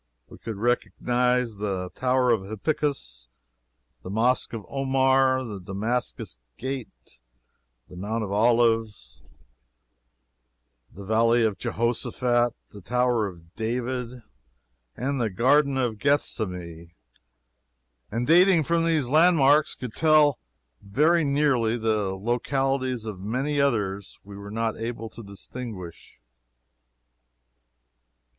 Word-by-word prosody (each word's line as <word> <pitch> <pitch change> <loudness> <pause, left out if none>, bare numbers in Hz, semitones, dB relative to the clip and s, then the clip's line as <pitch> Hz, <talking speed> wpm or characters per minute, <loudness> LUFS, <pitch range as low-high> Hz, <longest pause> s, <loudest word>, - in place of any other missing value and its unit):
We - - -13
could 115 -2 -6
recognize 120 0 0
the 95 -3 -3
Tower 130 -1 +2
of 110 -4 +2
Hippicus, 110 - -3 0.7
the - - -9
Mosque 115 +5 +1
of 110 -3 -6
Omar, 135 -1 +2
the 105 -4 -6
Damascus 100 - -3 0.2
Gate, 130 - -7 0.7
the - - -13
Mount 110 +5 -3
of 100 - -5
Olives, 110 - +1 1.7
the 100 0 -11
Valley 115 +3 +3
of 105 -3 -1
Jehoshaphat, 120 +1 0 0.2
the 100 - -12
Tower 120 +1 +1
of 85 -2 -13
David, 125 +1 -3 0.7
and 135 +1 -2
the 115 - 0
Garden 135 +7 +3
of 120 -5 -1
Gethsemane 90 - -2 1.2
and 115 +3 -2
dating 175 +2 +5
from 165 +3 +1
these 160 -6 +1
landmarks 150 -1 +4
could 125 -4 -7
tell 155 -1 +4 0.4
very 155 +11 +2
nearly 140 -5 +1
the 110 -4 0
localities 130 +3 -1
of 105 -4 -6
many 130 +9 -1
others 100 -7 -1
we 100 0 -11
were 100 0 -9
not 115 +1 -2
able 115 0 -5
to 115 - -11
distinguish. 100 -3 -9
120 Hz, 110 wpm, -25 LUFS, 105-130 Hz, 1.7 s, dating